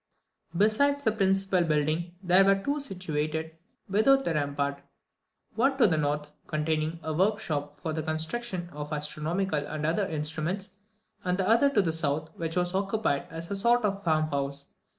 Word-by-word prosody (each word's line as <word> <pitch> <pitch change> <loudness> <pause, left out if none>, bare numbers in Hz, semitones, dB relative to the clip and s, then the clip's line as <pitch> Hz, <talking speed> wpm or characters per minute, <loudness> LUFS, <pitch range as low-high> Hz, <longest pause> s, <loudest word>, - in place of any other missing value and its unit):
Besides 280 +8 +3
the 220 - +3
principal 195 -3 +2
building 155 +2 0
there 185 +1 +6
were 195 0 +5
other 195 0 -3
two 285 +1 0
situated 160 - -3 0.3
without 270 +7 +4
the 170 - +1
rampart, 140 -1 -1 0.7
one 270 +4 +2
to 265 - +6
the 175 -6 +4
north, 150 0 -1 0.2
containing 155 +1 -1
a 155 - -2
workshop 155 -6 -1
for 160 - -3
the 160 - -2
construction 175 +4 -3
of 150 +1 -7
astronomical 155 +3 -1
and 150 +1 -4
other 180 +5 +1
instruments, 160 +5 -3 0.5
and 180 -1 +1
the 190 -1 0
other 235 +6 +5
to 215 -8 +3
the 165 -3 0
south, 155 0 -1
which 165 -1 -4
was 180 0 0
occupied 195 -6 0
as 165 +3 -7
a - - 0
sort 235 +3 +3
of 200 -1 -1
farm 155 -2 +2
house. 140 0 -3
170 Hz, 170 wpm, -28 LUFS, 155-195 Hz, 0.7 s, there